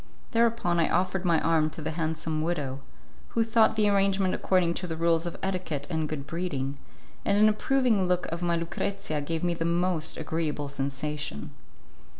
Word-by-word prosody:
Thereupon 230 Hz, -7 st, +2 dB
I 165 Hz, -, +3 dB
offered 185 Hz, +2 st, 0 dB
my 170 Hz, -2 st, +4 dB
arm 160 Hz, -2 st, +3 dB
to 155 Hz, -, -11 dB
the 160 Hz, -, -2 dB
handsome 160 Hz, -1 st, -2 dB
widow, 145 Hz, -5 st, -2 dB, 0.6 s
who 230 Hz, -, +5 dB
thought 225 Hz, -1 st, +3 dB
the 215 Hz, -1 st, +3 dB
arrangement 195 Hz, -2 st, +2 dB
according 180 Hz, -3 st, +2 dB
to 180 Hz, -, -4 dB
the 160 Hz, -1 st, -4 dB
rules 165 Hz, 0 st, +2 dB
of 170 Hz, -, -5 dB
etiquette 180 Hz, -7 st, -2 dB
and 160 Hz, -2 st, -1 dB
good 145 Hz, -3 st, -4 dB
breeding, 140 Hz, -5 st, -3 dB, 0.4 s
and 200 Hz, -, +2 dB
an 215 Hz, +1 st, +6 dB
approving 220 Hz, -2 st, +2 dB
look 180 Hz, 0 st, +1 dB
of 170 Hz, +1 st, -3 dB
my 170 Hz, -1 st, +1 dB
Lucrezia 165 Hz, -1 st, -2 dB
gave 165 Hz, +3 st, -3 dB
me 175 Hz, -1 st, +2 dB
the 165 Hz, 0 st, -3 dB
most 170 Hz, -1 st, +1 dB
agreeable 155 Hz, -2 st, -2 dB
sensation. 140 Hz, -, -3 dB
170 Hz, 170 wpm, -28 LUFS, 155-185 Hz, 0.6 s, an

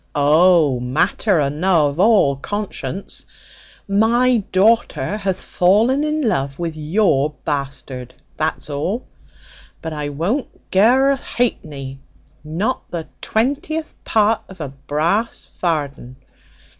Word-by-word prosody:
"O, 150 Hz, -1 st, +4 dB
matter 160 Hz, -, +1 dB
enow 155 Hz, +3 st, +2 dB
of 145 Hz, +3 st, -2 dB
all 195 Hz, -9 st, +4 dB
conscience: 195 Hz, 0 st, -5 dB, 0.6 s
my 235 Hz, +5 st, +3 dB
daughter 195 Hz, -, +2 dB
hath 195 Hz, -3 st, -2 dB
fallen 220 Hz, +10 st, +2 dB
in 305 Hz, -3 st, 0 dB
love 140 Hz, -8 st, -1 dB
with 170 Hz, -2 st, -3 dB
your 155 Hz, -3 st, +1 dB
bastard, 135 Hz, -3 st, -4 dB, 0.2 s
that's 155 Hz, 0 st, -2 dB
all; 165 Hz, -, -3 dB, 0.7 s
but 160 Hz, -1 st, -5 dB
I 150 Hz, -1 st, -3 dB
won't 180 Hz, -, -1 dB, 0.2 s
ge -, -, -2 dB
her 255 Hz, +7 st, +5 dB
a 275 Hz, -, +1 dB
hapeny, 145 Hz, -, -3 dB, 0.4 s
not 185 Hz, +12 st, -2 dB
the 165 Hz, -2 st, -5 dB
twentieth 290 Hz, +7 st, -1 dB
part 220 Hz, 0 st, +2 dB
of 190 Hz, -1 st, -12 dB
a 150 Hz, -4 st, -4 dB
brass 155 Hz, -, -1 dB
varden. 145 Hz, -7 st, -3 dB
175 Hz, 115 wpm, -20 LUFS, 145-220 Hz, 0.7 s, her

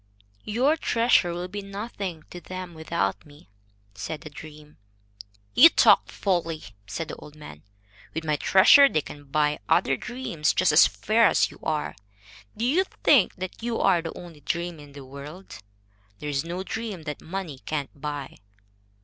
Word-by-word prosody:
"Your 260 Hz, +9 st, +2 dB
treasure 230 Hz, -, +2 dB
will 175 Hz, +1 st, -4 dB
be 205 Hz, +2 st, -6 dB
nothing 195 Hz, -4 st, -6 dB
to 175 Hz, -, -8 dB
them 185 Hz, -1 st, -7 dB
without 160 Hz, +1 st, -2 dB
me," 145 Hz, -7 st, -18 dB, 0.4 s
said 100 Hz, +11 st, -6 dB
the 155 Hz, -, -10 dB
dream. 150 Hz, 0 st, -12 dB, 0.8 s
"You 330 Hz, -, +9 dB
talk -, -, +5 dB
folly," 170 Hz, -5 st, -2 dB, 0.2 s
said 105 Hz, +12 st, -4 dB
the -, -, -5 dB
old 150 Hz, -, -13 dB
man. 75 Hz, -, -12 dB, 0.5 s
"With 160 Hz, -, -3 dB
my 155 Hz, -1 st, +1 dB
treasure 235 Hz, -, +7 dB
they 155 Hz, -, 0 dB
can 145 Hz, 0 st, -11 dB
buy 150 Hz, +1 st, 0 dB
other 135 Hz, -, +3 dB
dreams 170 Hz, -, -2 dB
just 185 Hz, -3 st, +3 dB
as 150 Hz, -, +7 dB
fair 225 Hz, +1 st, +2 dB
as -, -, +2 dB
you -, -, -15 dB
are. 155 Hz, -1 st, -2 dB, 0.6 s
Do 230 Hz, -, -1 dB
you 315 Hz, +10 st, +3 dB, 0.2 s
think 265 Hz, -10 st, +5 dB
that 185 Hz, +3 st, -7 dB
you 235 Hz, 0 st, -2 dB
are 180 Hz, -3 st, +3 dB
the 165 Hz, -, -7 dB
only 170 Hz, -4 st, -11 dB
dream 170 Hz, +2 st, -3 dB
in 145 Hz, -1 st, -14 dB
the 140 Hz, -1 st, -10 dB
world? 145 Hz, +8 st, -10 dB, 0.6 s
There 150 Hz, -, -6 dB
is 140 Hz, -1 st, -1 dB
no 175 Hz, +3 st, -5 dB
dream 210 Hz, -4 st, -5 dB
that 150 Hz, -2 st, -6 dB
money 170 Hz, -6 st, -6 dB
cannot 145 Hz, -1 st, -4 dB
buy." 145 Hz, -2 st, -5 dB
165 Hz, 165 wpm, -25 LUFS, 150-195 Hz, 0.8 s, You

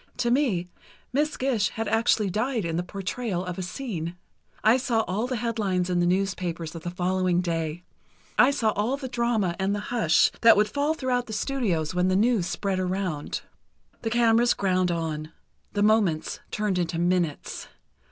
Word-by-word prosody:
To 240 Hz, -1 st, +1 dB
me, 235 Hz, -10 st, +1 dB, 0.5 s
Miss 300 Hz, +3 st, +1 dB
Gish 240 Hz, -7 st, +1 dB
had 225 Hz, 0 st, -4 dB
actually 220 Hz, -2 st, +2 dB
died 225 Hz, 0 st, -1 dB
in 165 Hz, -1 st, -2 dB
the 175 Hz, -, +1 dB
portrayal 195 Hz, +1 st, -3 dB
of 180 Hz, +1 st, -5 dB
a -, -, -2 dB
scene. 180 Hz, -, -4 dB, 0.5 s
I 220 Hz, +4 st, +6 dB
saw 245 Hz, -4 st, +1 dB
all 215 Hz, +4 st, -2 dB
the 255 Hz, -, -2 dB
headlines 205 Hz, -6 st, -1 dB
in 175 Hz, -, +2 dB
the 175 Hz, -, +2 dB
newspapers 180 Hz, -3 st, -1 dB
of 165 Hz, -, -7 dB
the 175 Hz, -, -4 dB
following 180 Hz, 0 st, +1 dB
day. 165 Hz, -1 st, -2 dB, 0.5 s
I 260 Hz, -, +6 dB
saw 240 Hz, -6 st, +1 dB
all 220 Hz, +7 st, -1 dB
the 275 Hz, -2 st, -5 dB
drama 235 Hz, -7 st, 0 dB
and 195 Hz, +2 st, +1 dB
the -, -, -2 dB
hush 215 Hz, -10 st, +4 dB
that 230 Hz, -2 st, +7 dB
would 210 Hz, 0 st, +4 dB
fall 285 Hz, +6 st, 0 dB
throughout 250 Hz, -4 st, -1 dB
the 220 Hz, -, -6 dB
studios 210 Hz, -, -1 dB
when 180 Hz, 0 st, +2 dB
the 185 Hz, -, +2 dB
news 215 Hz, -3 st, +2 dB
spread 190 Hz, +2 st, -2 dB
around. 185 Hz, -5 st, -2 dB, 0.6 s
The 225 Hz, -, -1 dB
cameras 235 Hz, 0 st, +4 dB
ground 185 Hz, -2 st, +1 dB
on—the 165 Hz, +4 st, -4 dB
moments 210 Hz, -7 st, +2 dB
turned 210 Hz, -3 st, -1 dB
into 170 Hz, -1 st, -1 dB
minutes. 175 Hz, -3 st, -1 dB
195 Hz, 170 wpm, -26 LUFS, 175-235 Hz, 0.6 s, that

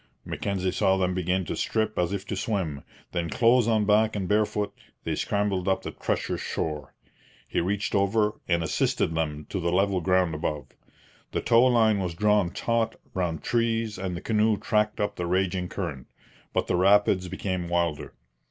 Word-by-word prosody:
Mackenzie 95 Hz, -2 st, -2 dB
saw 95 Hz, +1 st, +2 dB
them 90 Hz, -1 st, +1 dB
begin 90 Hz, +1 st, 0 dB
to -, -, -3 dB
strip 110 Hz, -2 st, -1 dB
as 90 Hz, 0 st, +1 dB
if 100 Hz, -1 st, -3 dB
to -, -, -4 dB
swim; 85 Hz, -10 st, -2 dB, 0.3 s
then, 85 Hz, -2 st, -2 dB
clothes 120 Hz, -, +4 dB
on 110 Hz, -2 st, +2 dB
back 110 Hz, +1 st, +3 dB
and 95 Hz, -3 st, -2 dB
barefoot, 105 Hz, 0 st, 0 dB, 0.3 s
they -, -, -2 dB
scrambled 100 Hz, -2 st, -1 dB
up 95 Hz, -, +1 dB
the -, -, -5 dB
treacherous -, -, -2 dB
shore. 75 Hz, -3 st, -4 dB, 0.5 s
He -, -, 0 dB
reached 100 Hz, +4 st, -1 dB
over, 105 Hz, +2 st, +1 dB
and 85 Hz, -1 st, +1 dB
assisted 80 Hz, 0 st, 0 dB
them 75 Hz, -2 st, -2 dB
to 100 Hz, -, -2 dB
the 85 Hz, -1 st, 0 dB
level 95 Hz, 0 st, +2 dB
ground 90 Hz, -1 st, +2 dB
above. 75 Hz, -3 st, -3 dB, 0.6 s
The -, -, 0 dB
tow 115 Hz, +1 st, +5 dB
line 110 Hz, -4 st, +4 dB
was 90 Hz, -3 st, -3 dB
drawn 105 Hz, -1 st, +3 dB
taut 115 Hz, +3 st, -1 dB, 0.2 s
round 85 Hz, -4 st, -2 dB
trees 115 Hz, -3 st, 0 dB
and 90 Hz, -2 st, -3 dB
the -, -, -7 dB
canoe 110 Hz, 0 st, +2 dB
tracked 105 Hz, +1 st, 0 dB
up 105 Hz, 0 st, -1 dB
the 90 Hz, -, -2 dB
raging 90 Hz, 0 st, 0 dB
current. 80 Hz, -10 st, -5 dB, 0.4 s
But -, -, 0 dB
the 90 Hz, -, 0 dB
rapids 95 Hz, 0 st, +4 dB
became 90 Hz, -2 st, -3 dB
wilder. 85 Hz, -4 st, -1 dB
95 Hz, 175 wpm, -26 LUFS, 85-105 Hz, 0.6 s, tow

